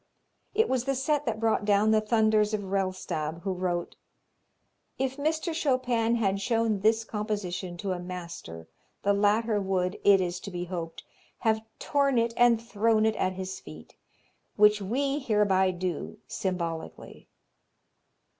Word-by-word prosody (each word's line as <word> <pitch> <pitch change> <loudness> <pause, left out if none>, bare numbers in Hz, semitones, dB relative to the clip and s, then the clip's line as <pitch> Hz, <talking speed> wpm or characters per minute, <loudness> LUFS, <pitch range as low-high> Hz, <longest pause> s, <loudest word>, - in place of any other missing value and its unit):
It 445 +2 +3
was 255 -2 0
the 275 0 0
set 290 +2 0
that 220 -1 -1
brought 225 -2 +1
down 205 +1 +3
the 215 0 +4
thunders 215 -1 +2
of 200 -2 -6
Rellstab, 185 -5 -2
who 195 -1 -1
wrote: 180 -1 -3 1.0
"If 265 0 -2
Mr. 315 +3 -1
Chopin 250 -6 +1
had 200 -4 0
shown 225 -2 +1
this 220 +3 +3
composition 205 -5 -4
to 195 +2 -3
a 180 - -2
master 170 - -8 0.4
the 200 - +3
latter 210 +1 +2
would, 185 -1 -1
it 200 -1 +6
is 180 -1 -2
to - - -7
be 175 -2 -4
hoped, 170 -2 -6 0.4
have 220 -1 +2 0.2
torn 280 -3 +1
it 230 0 +1
and 240 -2 +5
thrown 225 -1 +1
it 220 - +2
at 185 - 0
his 190 0 -5
feet, 80 0 -13 0.6
which 210 0 +5
we 275 +8 0
hereby 210 -7 +2
do 180 -2 -4
symbolically." 170 -4 -5
210 Hz, 145 wpm, -28 LUFS, 185-230 Hz, 1.0 s, it